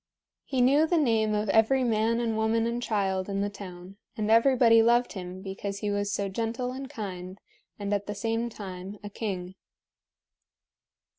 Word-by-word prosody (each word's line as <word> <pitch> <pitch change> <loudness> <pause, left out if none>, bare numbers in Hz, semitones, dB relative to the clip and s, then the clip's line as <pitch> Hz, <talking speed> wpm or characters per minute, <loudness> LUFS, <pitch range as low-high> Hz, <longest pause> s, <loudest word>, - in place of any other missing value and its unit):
He 260 -2 0
knew 285 +5 +5
the 345 - +2
name 220 -7 +2
of 210 +1 -1
every 225 +5 +4
man 230 0 +1
and 230 -2 0
woman 220 +1 +1
and 235 +1 -2
child 195 -4 -1
in 195 0 -1
the 205 0 -1
town, 185 -1 -10 0.2
and 215 0 0
everybody 230 -1 +6
loved 240 +2 +3
him 185 -1 -7
because 200 0 -5
he 205 0 -2
was 205 0 -1
so 200 -2 -1
gentle 230 +5 -2
and 265 +1 -6
kind 190 -6 -6 0.4
and 205 0 -2
at 200 -1 -1
the 205 - -4
same 225 +3 -1
time 195 -2 -8
a 205 - -7
king. 190 -4 -4
215 Hz, 170 wpm, -28 LUFS, 200-235 Hz, 0.4 s, everybody